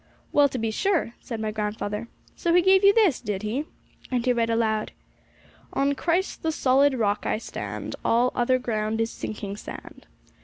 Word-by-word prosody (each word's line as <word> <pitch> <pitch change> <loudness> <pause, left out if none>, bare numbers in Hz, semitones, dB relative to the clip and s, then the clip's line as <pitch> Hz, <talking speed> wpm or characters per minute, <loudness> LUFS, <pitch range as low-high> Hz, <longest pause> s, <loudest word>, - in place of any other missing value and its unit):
'Well, 290 -1 +5
to 260 - -4
be 225 -2 -1
sure!' 340 - 0
said 230 -3 -6
my 215 0 -2
grandfather 210 0 -3 0.3
'So 340 -1 +1
he 355 - +5
gave 380 +1 +5
you 400 - +8
this, 405 - +3
did 205 -3 -3
he?' 245 +8 -2 0.4
and 245 -2 -1
he 250 - +3
read 230 -1 0
aloud: 220 -2 0 0.8
'On 280 +1 +2
Christ, 345 +6 -1
the 320 - 0
solid 275 -1 +3
Rock, 210 -3 0
I - - +1
stand, 225 - -6
All 240 +2 +3
other 250 +1 +2
ground 220 -3 -2
is 225 0 0
sinking 205 -2 -6
sand.' - - -10
235 Hz, 180 wpm, -25 LUFS, 215-285 Hz, 0.8 s, you